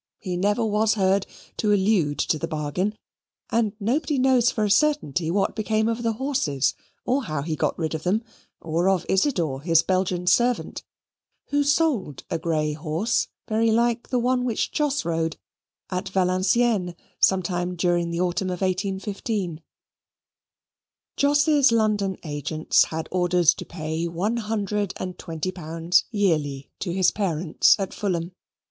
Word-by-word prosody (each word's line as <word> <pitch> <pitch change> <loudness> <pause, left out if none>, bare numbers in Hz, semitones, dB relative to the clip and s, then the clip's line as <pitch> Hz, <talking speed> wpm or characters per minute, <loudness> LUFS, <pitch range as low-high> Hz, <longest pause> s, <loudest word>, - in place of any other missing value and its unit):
He 185 -3 -4
never 205 +5 +1
was 215 +1 +2
heard 195 -1 +2 0.3
to 210 - +1
allude 190 -7 +2
to 155 - 0
the 165 - -3
bargain, 160 +8 -2 0.5
and 225 -3 +1
nobody 275 +8 0
knows 255 -2 +4
for 215 - -1
a 205 - +1
certainty 205 - +2
what 195 +3 0
became 220 0 0
of 230 +1 -1
the 230 -1 0
horses, 230 - 0 0.3
or 260 +1 0
how 155 -3 -3
he 160 0 -2
got - - -1
rid 160 -2 -2
of 160 - -3
them, 195 +7 0 0.4
or 170 +3 0
of 190 -3 +1
Isidor, 175 - +1
his 165 0 +3
Belgian 185 -1 0
servant, 240 +7 +1 0.7
who 290 0 +2
sold 285 - 0
a - - -1
grey 155 -2 0
horse, 160 +9 -1 0.2
very 225 0 +2
like 235 +1 +1
the 250 - +1
one 250 +1 +1
which 235 -3 -1
Jos 290 - 0
rode, 165 -1 -1 0.5
at 185 0 -3
Valenciennes 185 +1 +1 0.2
sometime 180 -1 +1
during 175 -1 +1
the 170 +1 -2
autumn 180 +1 0
of 180 0 -4
1815. 190 -1 -2 1.5
Jos's 290 -1 +4
London 210 -4 +1
agents 155 0 +1
had 160 0 -5
orders 175 -2 +3
to - - -8
pay 160 0 -3
one 190 +8 -1
hundred 210 -3 -2
and 185 -1 -6
twenty 165 +1 -4
pounds 165 0 0
yearly 155 - -1
to 175 - -3
his 185 0 +3
parents 175 -5 +2
at 195 -2 -3
Fulham. 175 -4 -2
190 Hz, 150 wpm, -24 LUFS, 170-225 Hz, 1.5 s, knows